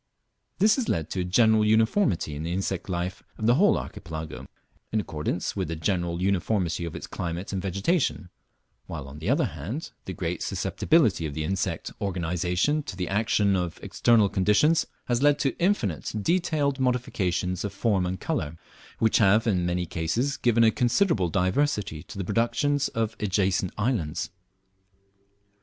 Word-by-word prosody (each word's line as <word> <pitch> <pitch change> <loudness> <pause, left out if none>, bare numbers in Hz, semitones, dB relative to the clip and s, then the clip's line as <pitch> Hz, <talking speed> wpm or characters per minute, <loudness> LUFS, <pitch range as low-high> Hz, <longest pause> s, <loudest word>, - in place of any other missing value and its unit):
This 210 +6 +4
has 255 - -1
led 80 -2 -1
to 95 - -2
a - - +1
general 110 +4 +4
uniformity 110 - +2
in 75 - -5
the 85 +2 -3
insect 95 0 -2
life 90 +1 -3 0.2
of 110 - -3
the 120 - +5
whole 195 +10 +4
Archipelago, 80 -6 -7 0.4
in 110 - +1
accordance 75 -7 -3
with - - -2
the 80 - -3
general 85 +1 -1
uniformity 95 -3 0
of 85 - -6
its - - -6
climate 90 +3 -5
and 95 - -1
vegetation; 100 - 0 0.6
while 75 -5 -6
on 70 +2 -10
the 80 +7 -3
other 135 - +3
hand 95 - -5
the 95 - -5
great 85 -2 -3
susceptibility 115 - +1
of 70 - -7
the 80 - -2
insect 90 0 -2
organization 90 - 0
to 105 - -7
the 90 -1 -3
action 105 -1 +2
of 90 -3 -2
external 115 -4 +3
conditions 105 - +3 0.2
has 120 0 0
led 145 0 +5
to 140 -2 0
infinite 170 - 0
detailed 150 - +1
modifications 95 -8 0
of 100 - -3
form 100 -2 +1
and 95 0 -3
colour, 75 +2 -3 0.4
which 110 -1 +3
have 105 +1 +4
in 90 -6 +1
many 90 0 -1
cases 100 - -1
given 115 -1 +3
a 110 - +6
considerable 120 - +2
diversity 95 - 0
to - - -11
the 95 - -3
productions 120 +7 +1
of 115 -1 -2
adjacent 95 -2 +1
islands. 105 - -1
100 Hz, 160 wpm, -26 LUFS, 85-120 Hz, 0.6 s, a